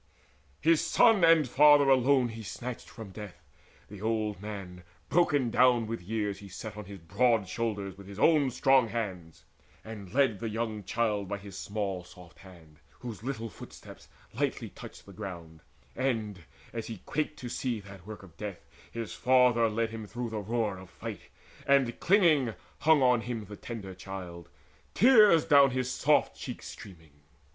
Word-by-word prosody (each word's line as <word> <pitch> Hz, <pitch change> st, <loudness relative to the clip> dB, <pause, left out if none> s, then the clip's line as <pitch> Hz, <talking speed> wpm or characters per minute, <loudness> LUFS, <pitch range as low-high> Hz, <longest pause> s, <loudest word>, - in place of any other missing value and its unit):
His 165 Hz, 0 st, +4 dB
son 225 Hz, -6 st, +4 dB
and 165 Hz, -4 st, +6 dB
father 145 Hz, +2 st, +6 dB
alone 130 Hz, -1 st, +4 dB
he 115 Hz, 0 st, -8 dB
snatched 120 Hz, +4 st, -7 dB
from 110 Hz, -5 st, -10 dB
death; 95 Hz, -4 st, -10 dB, 0.4 s
The 100 Hz, -1 st, -11 dB
old 110 Hz, -3 st, -1 dB
man 100 Hz, -4 st, -7 dB, 0.3 s
broken 145 Hz, -7 st, +2 dB
down 125 Hz, -2 st, +4 dB
with 115 Hz, -1 st, -5 dB
years 105 Hz, +1 st, -3 dB
he 100 Hz, -, -11 dB
set 105 Hz, +3 st, -8 dB
On 105 Hz, -, -8 dB
his 100 Hz, +1 st, -9 dB
broad 105 Hz, +5 st, +1 dB
shoulders 100 Hz, -3 st, -3 dB
with 100 Hz, -, -12 dB
his 100 Hz, 0 st, -10 dB
own 150 Hz, +2 st, +4 dB
strong 135 Hz, -1 st, +3 dB
hands, 95 Hz, -8 st, -5 dB, 0.4 s
And 105 Hz, -4 st, -9 dB
led 130 Hz, -5 st, +2 dB
the 115 Hz, -, -3 dB
young 110 Hz, -1 st, -3 dB
child 105 Hz, -1 st, -1 dB
by 100 Hz, +1 st, -3 dB
his 100 Hz, -1 st, -11 dB
small 100 Hz, -3 st, -3 dB
soft 90 Hz, -1 st, -16 dB
hand, 85 Hz, -5 st, -16 dB, 0.2 s
Whose 120 Hz, -4 st, -7 dB
little 115 Hz, -2 st, -4 dB
footsteps 100 Hz, -, -12 dB, 0.3 s
lightly -, -, -2 dB
touched -, -, -12 dB
the -, -, -13 dB
ground; 85 Hz, -4 st, -8 dB, 0.3 s
And, 110 Hz, -7 st, -2 dB, 0.3 s
as 115 Hz, -2 st, -5 dB
he 110 Hz, -5 st, -8 dB
quaked 155 Hz, 0 st, -2 dB
to 125 Hz, -, -7 dB
see 120 Hz, -2 st, -2 dB
that 100 Hz, -1 st, -13 dB
work 105 Hz, -2 st, -9 dB
of 85 Hz, -4 st, -15 dB
deaths 100 Hz, -3 st, -7 dB, 0.2 s
His 115 Hz, -6 st, -6 dB
father 125 Hz, -3 st, +4 dB
led 110 Hz, +1 st, -1 dB
him 110 Hz, -2 st, -7 dB
through 120 Hz, +1 st, -5 dB
the 110 Hz, -, -3 dB
roar 105 Hz, -2 st, -2 dB
of 95 Hz, -1 st, -13 dB
fight, -, -, -8 dB, 0.4 s
And 135 Hz, -4 st, +3 dB
clinging 160 Hz, -, +3 dB, 0.2 s
hung 155 Hz, -3 st, +4 dB
on 125 Hz, -2 st, +4 dB
him 115 Hz, -2 st, -5 dB
the 105 Hz, +1 st, -9 dB
tender 100 Hz, -4 st, -7 dB
child, 90 Hz, -2 st, -8 dB, 0.5 s
Tears 215 Hz, -9 st, +6 dB
down 140 Hz, -3 st, +6 dB
his 130 Hz, 0 st, -2 dB
soft -, -, +2 dB
cheeks -, -, -8 dB
streaming. 80 Hz, -6 st, -13 dB
110 Hz, 170 wpm, -29 LUFS, 100-125 Hz, 0.5 s, and